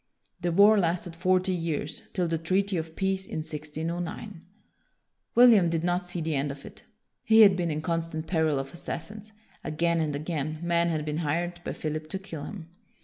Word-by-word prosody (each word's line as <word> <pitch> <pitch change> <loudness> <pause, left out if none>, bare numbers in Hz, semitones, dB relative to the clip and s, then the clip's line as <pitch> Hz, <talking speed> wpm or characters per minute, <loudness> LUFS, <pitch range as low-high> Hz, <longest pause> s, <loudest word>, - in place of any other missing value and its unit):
The 175 - 0
war 205 +4 +6
lasted 170 -1 -1
forty 185 +2 +2
years, 165 -3 -3
till 180 -2 0
the 165 -1 -1
treaty 190 +4 0
of 160 -1 -4
peace 190 -1 -1
in 155 - -4
1609. 165 +5 -5 0.9
William 230 -8 +7
did 165 -1 -1
not 180 +1 0
see 175 -1 -3
the 160 0 -1
end 140 +1 0
of 140 0 -10
it. - - -11 0.4
He 225 0 +6
had 200 -3 +8
been 175 -2 -1
in 155 0 -3
constant 165 -1 -2
peril 160 -4 +1
of 135 +2 -4
assassins. 205 +5 -6 0.3
Again 170 +2 0
and 155 -2 -1
again, 155 0 -3
men 170 0 +2
had 155 -2 -1
been 150 0 -2
hired 175 +2 -2
by - - -4
Philip 155 0 -4
to 190 - -2
kill 180 -7 -7
him. 175 -6 -8
170 Hz, 185 wpm, -27 LUFS, 155-185 Hz, 0.9 s, had